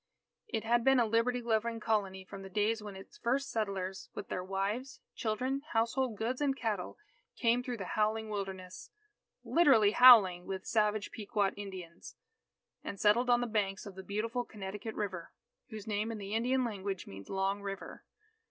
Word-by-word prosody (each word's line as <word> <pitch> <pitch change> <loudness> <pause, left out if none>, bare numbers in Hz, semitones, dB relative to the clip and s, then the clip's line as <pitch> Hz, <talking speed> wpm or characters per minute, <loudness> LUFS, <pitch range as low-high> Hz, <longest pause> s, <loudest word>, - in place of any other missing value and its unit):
It 225 -4 -2
had 235 +1 +2
been 270 0 +5
a 235 - +4
liberty 235 +3 +1
loving 230 0 0
Colony 200 -4 -1
from 195 +1 -9
the 195 - -9
days 215 +3 +1
when 205 -2 -8
its 195 - -12
first 270 - 0
settlers, 195 -4 -3
with 200 - -6
their 180 - -2
wives, 210 +8 -3
children, 255 +4 -1
household 230 +1 +1
goods, 245 +6 -2
and 275 -2 +1
cattle, 210 -7 -3 0.4
came 235 0 +2
through 250 -1 -4
the 195 - -5
howling 220 +1 +1
Wilderness 190 -2 -6 0.5
literally 265 -11 +5
howling 210 -8 +8
with 190 0 -4
savage 210 -1 +1
Pequot 205 -2 0
Indians 185 -4 -9 0.7
and 200 - -6
settled 235 +4 +4
on 240 0 +5
the - - 0
banks 205 -4 -1
of 200 - -8
the 190 - -8
beautiful 225 +5 -2
Connecticut 210 +1 -7
River, 185 -5 -4 0.4
whose 215 -3 -8
name 215 +1 -1
in 225 - -5
the 200 0 -6
Indian 250 +3 +2
language 200 -4 -4
means 95 0 -10
Long 195 +1 0
River. 195 -1 -7
215 Hz, 170 wpm, -32 LUFS, 195-235 Hz, 0.7 s, howling